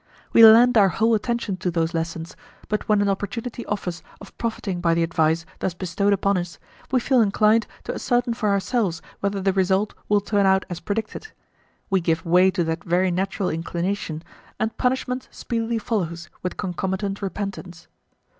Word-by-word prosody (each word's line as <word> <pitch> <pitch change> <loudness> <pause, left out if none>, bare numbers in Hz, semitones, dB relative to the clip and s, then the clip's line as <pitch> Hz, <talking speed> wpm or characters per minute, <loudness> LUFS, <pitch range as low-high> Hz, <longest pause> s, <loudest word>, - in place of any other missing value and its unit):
We 230 - +8
lend 230 +2 +8
our 195 -2 +5
whole 225 +5 +2
attention 225 -2 -1
to 185 - -2
those 165 -1 -1
lessons, 165 0 -4 0.3
but 210 0 -2
when 210 -1 +4
an - - 0
opportunity 220 +5 -3
offers 180 -4 -3 0.2
of 200 - -13
profiting 205 -6 -3
by 170 -1 +2
the 170 - +2
advice 165 0 +1
thus 180 - -2
bestowed 185 +3 0
upon 200 -1 +2
us, 170 -4 -6 0.3
we 260 - +3
feel 255 0 +3
inclined 215 +1 +3 0.2
to - - -4
ascertain 245 -1 0
for 220 -3 -1
ourselves 200 -2 0 0.2
whether 200 0 -1
the 195 0 +1
result 190 +2 +1 0.2
will 205 0 +4
turn 200 -1 +1
out 190 0 +3
as 175 - -4
predicted; 220 - -4 0.6
we 190 -1 +3
give 165 -1 0
way 180 +3 +5
to 185 -2 0
that 160 +1 -3
very 180 +2 +1
natural 190 +1 -1
inclination, 170 0 -3 0.4
and 220 0 -1
punishment 255 0 -1
speedily 230 -1 -3
follows 175 -7 -3
with 180 - -4
concomitant 190 +2 -3
repentance. 190 -3 -6
195 Hz, 170 wpm, -23 LUFS, 175-220 Hz, 0.6 s, We